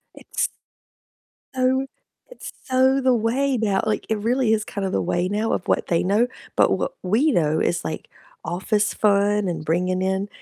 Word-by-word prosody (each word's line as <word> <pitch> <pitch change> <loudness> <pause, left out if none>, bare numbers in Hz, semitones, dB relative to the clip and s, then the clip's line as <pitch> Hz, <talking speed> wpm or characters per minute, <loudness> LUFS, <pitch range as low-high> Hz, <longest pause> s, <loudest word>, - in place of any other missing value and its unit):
It's - - -2 1.1
Oh, 260 +1 +1 0.4
it’s - - -9
so 260 +1 +3
the 255 -1 +3
way 250 +4 +1
now, 205 -4 +1
like 215 - -1
it 220 - 0
really 235 +2 +1
is 215 -1 +1
kind 200 0 -5
of 190 - -1
the - - +1
way 175 - 0
now 215 +3 -1
of - - -3
what - - +1
they 170 - +1
know. 205 +6 +2 0.3
But - - +4
what - - -3
we 225 +12 +2
know 155 - +1
is 175 - 0
like 155 0 -5 0.4
office 205 +4 0
fun 205 0 +2
and 165 -3 -4
bringing 180 +3 0
in 190 +2 -1
210 Hz, 180 wpm, -22 LUFS, 185-245 Hz, 1.1 s, But